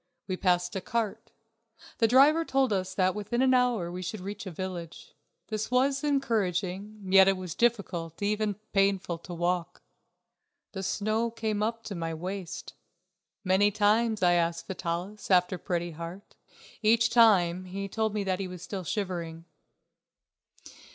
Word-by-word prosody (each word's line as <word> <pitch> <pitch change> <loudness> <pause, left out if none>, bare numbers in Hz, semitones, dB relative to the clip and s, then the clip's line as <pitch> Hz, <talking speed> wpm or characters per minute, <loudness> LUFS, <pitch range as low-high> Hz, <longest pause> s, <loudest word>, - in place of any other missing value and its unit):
We 185 - -2
passed 180 -1 +1
a 190 - -2
cart; 225 +1 -3 0.7
the 225 - +5
driver 280 +7 +6
told 265 -6 +1
us 185 -1 -2
that 185 -1 +2
within 210 +4 -1
an 260 0 +4
hour 245 -9 +2
we 180 +1 -5
should 185 +4 -5
reach 200 +2 -6
a - - -5
village. 175 -1 -7 0.4
This 215 -1 -3
was 270 +3 +2
encouraging, 210 - -1
yet 190 0 +6
it 195 -1 +3
was 180 -3 -5
difficult, 185 -9 -1
even 210 0 0 0.2
painful, 195 -3 +1
to 175 +1 -9
walk. 175 0 -2 0.9
The 190 - -5
snow 215 +4 0
came 220 -2 -2
up 230 +1 -1
to 210 - -6
my 165 -2 -3
waist. 185 +2 -6 0.7
Many 190 +2 +4
times 215 +1 +2
I 175 0 +5
asked 170 -1 0
Vitalis 185 +2 -4
after 180 -1 +3
Pretty 175 0 -2
Heart. 170 +5 -9 0.5
Each 225 +1 +4
time 185 -6 +4
he 195 +2 -5
told 220 +1 -1
me 210 - 0
that 190 -1 -1
he 195 - -3
was 180 -1 -9
still 190 0 -5
shivering. 170 -3 -4
195 Hz, 150 wpm, -28 LUFS, 180-220 Hz, 0.9 s, driver